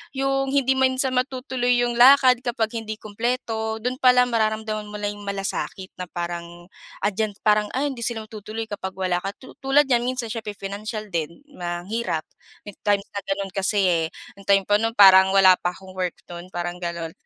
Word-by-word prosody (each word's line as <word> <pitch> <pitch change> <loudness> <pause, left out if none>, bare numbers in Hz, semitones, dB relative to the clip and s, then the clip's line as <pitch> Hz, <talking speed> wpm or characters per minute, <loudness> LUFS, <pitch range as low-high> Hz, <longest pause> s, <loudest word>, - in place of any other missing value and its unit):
yung 270 0 0
hindi 270 -1 +2
man 265 0 +2
sa 260 0 +1
matutuloy 255 -1 0
yung 240 0 -1
lakad 255 -1 +7
kapag 235 -2 -2
hindi 220 -1 -5
kumpleto, 220 0 -3
dun 250 +1 -2
palang 250 -1 +5
mararamdaman 215 -1 -1
mo 210 - -9
na 205 0 -2
yung 205 0 -11
malasakit 195 -1 -4
na 180 - -5
parang 175 0 -6 0.3
andiyan, 210 0 -1
parang, 210 0 +3
ay 285 +2 0
hindi 260 - -8
sila 225 -2 -3
matutuloy 215 +1 -7
kapag 190 -2 -5
wala 185 -2 0
ka, 195 +2 -5
tu 260 - -14
tulad 270 +2 +4
niyan 240 0 +2
minsan 250 -3 -3
siyempre 215 -3 -5
pinansyal 210 +2 -6
din, 170 - -4 0.2
mahirap. 175 +1 -3 0.4
May 205 - -8 0.2
time 200 -1 +3
na 200 - -3
ganun 195 0 -2
kasi 195 +2 0
eh 170 -3 +2 0.3
ang 195 - -16
time 195 -1 +4
pa 205 +2 +2
nun 225 +1 -1
parang 190 -1 +7
wala 190 -2 +7
pa 175 0 -2
akong 190 -1 -13
work 185 -2 -3 0.2
nun, 175 +1 -8
parang 175 0 -3
ganun. 170 -2 -4
210 Hz, 190 wpm, -23 LUFS, 190-245 Hz, 0.4 s, lakad